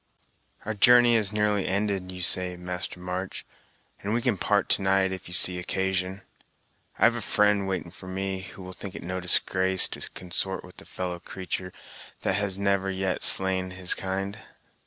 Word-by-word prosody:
"Our 110 - -2
journey 120 +3 +6
is 110 -4 +3
nearly 105 -2 +1
ended, 100 -2 -1
you 90 -1 -3
say, 90 0 +3
Master 90 0 -5
March, 90 +1 -5 0.6
and 105 +3 -1
we 120 - 0
can 125 -5 +2
part - - +1
to - - +2
night, 95 0 +2
if 95 - -7
you 90 - -7
see 90 0 +4
occasion. 95 +1 -2 0.7
I - - -1
have - - +6
a - - -3
fri'nd 105 -1 +2
waiting 90 -3 -3
for 95 +1 -11
me, 95 0 -3
who 95 0 -10
will 90 0 -8
think 95 +1 -8
it - - -7
no 90 +1 -3
disgrace 95 +1 +4
to - - -3
consort 95 +1 -2
with 90 - -13
a - - -15
fellow 90 -1 -5
creatur' 90 0 -5 0.5
that - - 0
has 100 -2 -1
never 100 -1 +1
yet 95 -1 -2
slain 95 -1 +2
his 95 -1 +1
kind." 95 +2 -4
95 Hz, 180 wpm, -26 LUFS, 90-100 Hz, 0.7 s, journey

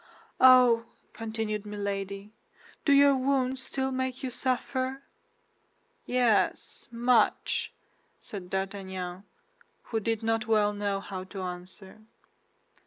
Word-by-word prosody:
"Oh," 250 -3 +7 0.3
continued 220 -1 -3
Milady, 200 0 -4 0.5
"do 285 - +4
your 280 0 +7
wounds 260 0 0
still 265 0 -2
make 260 0 -3
you 255 - -2
suffer?" 260 +1 -2 1.0
"Yes, 245 -4 +1
much," 240 0 +2 0.5
said 190 -4 -8
D'Artagnan, 190 -1 -4 0.6
who 225 - -2
did 225 +1 -2
not 225 +1 0
well 210 -2 +3
know 205 -1 -2
how 190 -2 -6
to 190 0 -7
answer. 185 +3 -7
220 Hz, 105 wpm, -28 LUFS, 195-255 Hz, 1.0 s, Oh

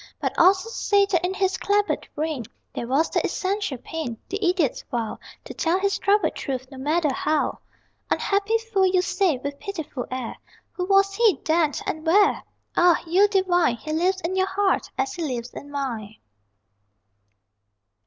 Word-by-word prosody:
But - - -1
also 375 +4 +4
say 405 -3 +2
that 350 -2 +2
in 365 +2 -1
his 380 -1 +1
clabbered 410 0 0
brain 300 -6 -2 0.3
There 235 - -4
was 280 +6 +1
the - - +1
essential 395 -7 -1
pain 250 -3 -5
The 400 +2 -3
idiot's 350 -7 +1
vow 230 -3 -3 0.3
To - - -7
tell 345 +3 +1
his 395 0 0
troubled 400 -4 +2
Truth, 260 0 -5
no 265 - -9
matter 300 +1 +1
how. 305 +2 0 0.5
Unhappy 405 +3 +1
fool, 445 -4 +1
you 365 -1 +2
say, 365 -6 +1
with 280 +2 -6
pitiful 320 -10 -5
air: 255 -2 -5 0.3
Who 360 - -3
was 390 +1 +4
he, 425 - +3
then, 315 -2 +2
and 315 - -3
where? 395 +5 +4 0.3
Ah, 350 -1 +4
you 370 +5 +4
divine 365 - +2
He 310 +6 -5
lives 370 +4 +1
in 365 +2 -2
your 375 0 +2
heart, 390 0 0
as 400 0 -1
he 350 - -6
lives 250 -6 -3
in 285 - -9
mine. 235 -7 -4
350 Hz, 165 wpm, -24 LUFS, 285-390 Hz, 0.5 s, also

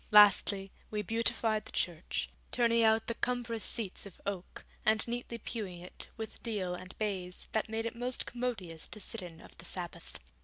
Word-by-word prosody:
Lastly, 200 -1 +7 0.2
we 210 -1 -1
beautified 225 0 +1
the - - -9
church, 170 -1 -1 0.2
turning 235 -1 +4
out 220 0 +5
the 230 - -1
cumbrous 235 -2 -1
seats 205 -3 +2
of 190 - -14
oak, 195 -3 -4 0.2
and 220 +1 +5
neatly 235 0 -3
pewing 205 -6 -4
it 180 +1 -8
with 220 -1 -6
deal 200 -6 -1
and 185 +1 -8
baize, 190 -4 -3
that 220 0 0
made 225 +1 -1
it 230 - -2
most 245 +1 -1
commodious 220 -10 -2
to 215 - -8
sit 215 +2 +1
in 170 -2 -9
of - - -14
the 170 - -10
Sabbath. 175 -2 -6
215 Hz, 180 wpm, -33 LUFS, 185-230 Hz, 0.2 s, Lastly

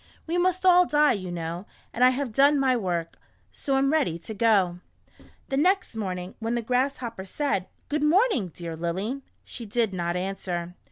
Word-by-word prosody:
"We 340 +2 -1
must 370 +1 +1
all 360 -1 +6
die, 295 0 +4
you 185 -4 -5
know, 170 +3 -5 0.3
and 245 - +1
I 255 - +8
have 260 -1 -2
done 280 +4 +5
my 260 -2 +3
work, 175 -7 -2 0.3
so 275 -1 -1
am 275 +2 +2
ready 275 - +1
to 170 +6 -8
go." 200 -5 +2 0.7
The 270 - -1
next 370 - +2
morning, 185 -3 -4
when 230 +1 -2
the 235 - -2
Grasshopper 250 -3 -1
said, 195 -2 -2
" - - -41
Good 300 0 -1
morning, 325 - +3
dear 165 0 -6
Lily," 190 +11 -3 0.2
she 235 - -8
did 220 -1 0
not 175 -1 -2
answer. 180 -2 -3
230 Hz, 180 wpm, -26 LUFS, 180-280 Hz, 0.7 s, I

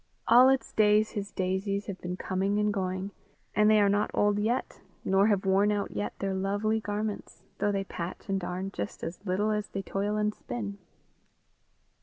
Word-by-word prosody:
All 250 +3 +8
its 270 0 0
days 215 0 +4
his 205 -1 -4
daisies 195 +2 -1
have 190 -2 -7
been 180 +1 -4
coming 195 +2 -1
and 210 0 +1
going, 185 0 -2 0.4
and 210 +1 +5
they 215 0 +6
are 205 - +5
not 205 +1 +2
old 205 0 +2
yet, 225 +4 -1 0.2
nor 195 +2 +4
have 200 -3 +1
worn 195 +2 +3
out 205 -1 -1
yet 105 0 -4
their 195 -1 -2
lovely 205 +3 0
garments, 210 0 -4 0.2
though 205 +1 +2
they 195 -1 -1
patch 175 -2 -6
and 195 -1 0
darn 185 +2 -4
just 100 - -5
as 170 +4 -6
little 205 +4 +1
as 210 -1 -1
they 195 - -5
toil 200 +2 -2
and 210 0 +1
spin. 205 -4 -6
200 Hz, 185 wpm, -29 LUFS, 190-210 Hz, 0.4 s, All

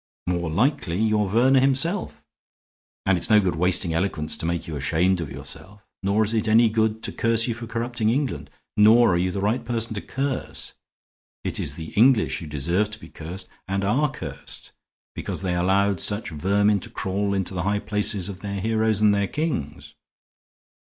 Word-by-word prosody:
"More 85 -2 -1
likely 95 - 0
you 110 -1 +2
are 105 - 0
Verner 125 +7 +4
himself; 140 +9 0 0.8
and 95 -2 +3
it's 85 - +2
no 105 -1 +7
good 95 -5 0
wasting 90 0 +1
eloquence 80 -3 -1
to 80 - -3
make 85 0 -2
you 80 - -5
ashamed 85 +6 +1
of 80 - -5
yourself. 105 - -9 0.2
Nor 100 +3 +2
is 110 +1 0
it 110 -1 0
any 110 +1 +5
good 110 0 0
to - - 0
curse 115 0 +2
you 120 - 0
for 115 0 -8
corrupting 115 -1 -1
England; 135 +3 -1 0.3
nor 110 0 +6
are - - +2
you 90 +1 0
the 95 - -3
right 110 +5 0
person 115 -1 0
to 100 - -4
curse. 135 0 -4 0.7
It - - -1
is - - -1
the 80 -1 -8
English 105 - +4
who 80 - -8
deserve 85 +8 0
to 105 +1 -6
be 80 - -12
cursed, 90 +4 -7 0.2
and 95 +1 -1
are 130 +10 +2
cursed, 75 - -7 0.4
because - - -4
they 90 -2 0
allowed 95 +2 +2
such 105 -1 -1
vermin 100 +6 +2
to - - -8
crawl 100 0 -2
into 95 -1 -1
the 90 - -2
high 100 +4 0
places 105 -2 +1
of 95 -2 -7
their 100 0 -4
heroes 110 0 +1
and 105 -1 +5
their 100 -1 +1
kings. 95 - -4
100 Hz, 190 wpm, -24 LUFS, 90-115 Hz, 0.8 s, no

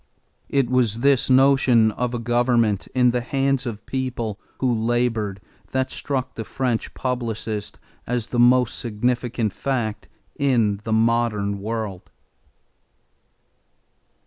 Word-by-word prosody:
It 135 -3 +2
was 120 -3 +1
this 140 -1 +3
notion 130 -4 +5
of 125 +3 -2
a - - 0
government 120 -3 +1
in 125 -1 +4
the 125 0 -1
hands 135 +1 0
of 110 -2 -6
people 120 -5 -3 0.2
who 130 -2 +1
labored 115 -3 0 0.3
that 130 0 0
struck 130 -2 -3
the 115 - -5
French 125 0 -2
publicist 115 -4 -3 0.3
as 120 -2 -1
the 120 - +1
most 125 0 +4
significant 120 -1 -1
fact 115 -6 -3 0.3
in 115 -8 +1
the 110 - -3
modern 110 -3 +1
world. 105 -3 -4
120 Hz, 120 wpm, -23 LUFS, 110-130 Hz, 0.3 s, notion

